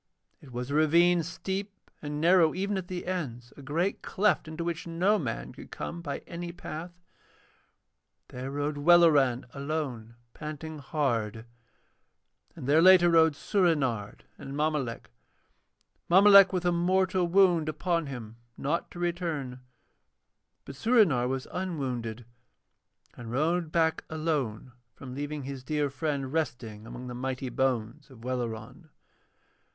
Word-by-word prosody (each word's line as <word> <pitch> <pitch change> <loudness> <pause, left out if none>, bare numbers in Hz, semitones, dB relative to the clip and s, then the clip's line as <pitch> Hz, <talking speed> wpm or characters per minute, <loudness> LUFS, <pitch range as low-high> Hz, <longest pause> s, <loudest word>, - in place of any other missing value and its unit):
It 140 - -14
was 125 +2 -5
a - - -2
ravine 170 +3 +4
steep 190 +4 -6
and 150 0 -4
narrow 170 -1 +4
even 200 +2 -1
at 185 -2 -4
the 180 -1 -5
ends, 125 -10 -4
a - - -12
great 165 +8 -1
cleft 205 -4 +1
into 160 +2 -5
which 170 0 -4
no 185 +6 +2
man - - -4
could - - -12
come 170 - -6
by 145 -4 -5
any 170 0 -6
path. 175 +1 -8 1.3
There 130 +1 -6
rode 145 +1 -2
Welleran 145 -6 +5
alone, 140 -6 -4 0.2
panting 155 0 -7
hard; 115 -8 -2 1.1
and - - -8
there 150 +4 +4
later 180 -1 +7
rode 160 -2 +5
Soorenard 140 - 0 0.2
and 135 +1 -7
Mommolek, 150 - -2 1.0
Mommolek 195 +1 +8
with 180 -2 -2
a 175 - +3
mortal 185 +1 +1
wound 175 -3 +4
upon 170 0 -1
him 115 -4 -8 0.2
not 155 +5 -2
to - - -12
return, 165 -7 -3 1.1
but - - -8
Soorenard 155 - +3
was 130 0 -3
unwounded 125 - -4 0.9
and 120 -2 -9
rode 160 +5 0
back 160 -1 +1
alone 145 -7 -2 0.2
from 130 -2 -9
leaving 145 +1 -4
his 135 -1 -7
dear 150 0 -1
friend 140 -2 -3
resting 115 -9 -3
among 125 +2 -8
the 125 - -6
mighty 130 +1 -3
bones 130 +2 -1
of 120 -4 -15
Welleran. 120 -3 -5
155 Hz, 135 wpm, -28 LUFS, 130-175 Hz, 1.3 s, Mommolek